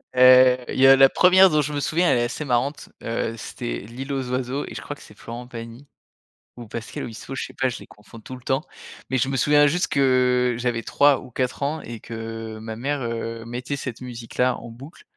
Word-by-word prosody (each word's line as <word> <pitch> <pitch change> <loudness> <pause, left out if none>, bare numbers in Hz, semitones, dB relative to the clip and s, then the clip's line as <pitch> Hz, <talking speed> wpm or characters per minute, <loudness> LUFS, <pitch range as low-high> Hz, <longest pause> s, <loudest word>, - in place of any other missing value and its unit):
Heu, 130 0 +7
il - - -3
y 135 - +7
a 135 - +9
la 135 0 +7
1re 185 +1 +6
dont 150 - +3
je 150 +1 -3
me 145 - -1
souviens, 170 +5 +1
elle - - +3
est 120 - +1
assez 120 +5 -3
marrante, 130 +3 -1
heu, 115 0 -2
c'était - - -5
L'île 125 +7 -8
aux 130 -2 -3
oiseaux 130 +2 -2
et - - -8
je - - -6
crois 145 - -6
que - - -18
c'est 105 - -16
Florent 120 +1 -8
Pagny 115 +3 -9 0.7
ou 120 -1 -9
Pascal 115 +1 -6
Obispo, 120 +3 -7
je - - -3
sais - - -14
pas, 130 - 0
je - - -6
les - - -13
confonds 105 +2 -15
tout 130 +4 -9
le 125 - -13
temps. 135 +5 -1 0.5
Mais 130 - +1
je 135 +2 0
me 135 - -1
souviens 145 +3 +5
juste 180 +5 +1
que, 125 -3 +2
j'avais 120 -2 -1
3 145 -1 +3
ou 130 - -12
4 130 +3 -2
ans, 150 +2 -2
et 120 -1 -8
que, 115 -1 -7
ma 110 0 -6
mère, 140 +4 -2
heu, 115 -1 -4
mettait 125 +4 -4
cette 130 -3 -6
musique-là, 125 +1 -2
en 120 - -10
boucle. 135 +8 -13
125 Hz, 235 wpm, -23 LUFS, 115-135 Hz, 0.7 s, a